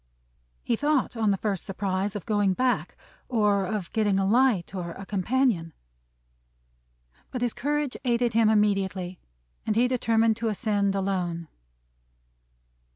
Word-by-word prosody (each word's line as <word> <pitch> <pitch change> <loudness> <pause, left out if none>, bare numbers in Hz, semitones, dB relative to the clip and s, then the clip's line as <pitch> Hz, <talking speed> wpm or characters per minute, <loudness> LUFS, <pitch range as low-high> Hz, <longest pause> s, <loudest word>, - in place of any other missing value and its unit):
He 235 - +1
thought, 290 0 0
on 220 -2 +1
the 200 - +2
first 200 -3 -2
surprise, 195 +1 -2
of 205 - -5
going 205 -3 +2
back; 255 +2 0 0.3
or 205 -5 +2
of 200 -4 -4
getting 210 -3 +2
a 195 - +1
light, 220 -4 +2
or 175 -3 -4
a 195 - -9
companion; 200 -4 0 1.6
but 250 -1 -3
his 240 - 0
courage 295 0 -1
aided 240 -2 +1
him 225 -1 +4
immediately, 195 -4 +1 0.4
and 215 - -1
he 240 +2 +4
determined 225 -3 +2
to 230 -1 -2
ascend 205 -2 0
alone. 180 -4 -2
210 Hz, 135 wpm, -26 LUFS, 195-235 Hz, 1.6 s, him